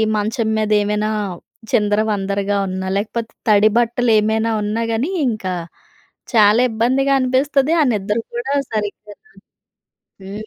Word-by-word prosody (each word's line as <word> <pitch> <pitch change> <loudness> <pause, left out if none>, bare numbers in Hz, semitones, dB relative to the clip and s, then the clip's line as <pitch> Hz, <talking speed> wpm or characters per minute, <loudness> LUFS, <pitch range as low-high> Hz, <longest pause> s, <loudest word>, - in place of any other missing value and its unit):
మంచం 220 +2 -1
మీద 215 0 -1
ఏమైనా 210 +1 -1 0.6
చిందర 210 0 +2
వందరగా 200 0 -1
ఉన్నా 190 0 -4
లేకపోతే 225 +2 -3 0.2
తడి 210 +1 +5
బట్టలు 240 0 +1
ఏమైనా 220 +1 0
ఉన్నా 210 +2 -2
గాని 250 +11 -1 0.2
ఇంకా 205 -5 -3 0.8
చాలా 215 +2 +5
ఇబ్బందిగా 260 +5 +1
అనిపిస్తది. 270 +3 +1
ఆ - - +5
నిద్ర 210 +1 -1 0.2
కూడా 265 +4 -2 0.2
సరిగ్గా 210 0 -4
రాదు. 435 - -27 0.9
హ్మ్. 210 +3 -7
215 Hz, 125 wpm, -19 LUFS, 205-240 Hz, 0.9 s, తడి